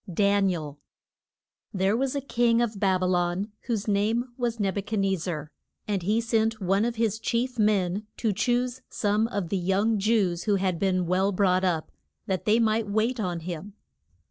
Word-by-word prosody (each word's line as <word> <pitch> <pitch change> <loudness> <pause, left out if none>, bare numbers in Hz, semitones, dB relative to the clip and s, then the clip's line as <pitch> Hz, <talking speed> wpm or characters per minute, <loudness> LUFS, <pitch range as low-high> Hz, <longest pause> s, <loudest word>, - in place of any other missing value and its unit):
DANIEL. 185 -6 +1 1.0
THERE 190 +2 +2
was 265 +3 -1
a 280 - -1
king 240 -3 +2
of 225 -4 -1
Bab 190 -2 +2
y 185 - +1
lon 180 +3 0 0.2
whose 225 -4 -1
name 215 +5 +1
was 240 -2 -2
Neb 195 -2 0
u - - 0
chad 210 +1 -3
nez 195 -3 +1
zar. 155 -3 -4 0.4
And 200 -3 -1
he 210 +6 +1
sent 225 -1 0
one 195 +2 +1
of 240 0 -2
his 220 -2 0
chief 240 +2 -1
men 205 -1 +1
to 220 -3 0
choose 245 +4 0
some 210 +1 +1
of 200 -6 -3
the 195 - 0
young 200 +4 +1
Jews 195 -5 +1
who 210 -2 +3
had 185 -3 0
been 185 -2 +1
well 185 +3 +1
brought 185 -1 +2
up, 170 -4 0 0.3
that 190 -2 -2
they 215 +1 +4
might 225 -1 +1
wait 220 +4 0
on 175 -5 -2
him. 175 +3 -6
205 Hz, 185 wpm, -26 LUFS, 185-225 Hz, 1.0 s, they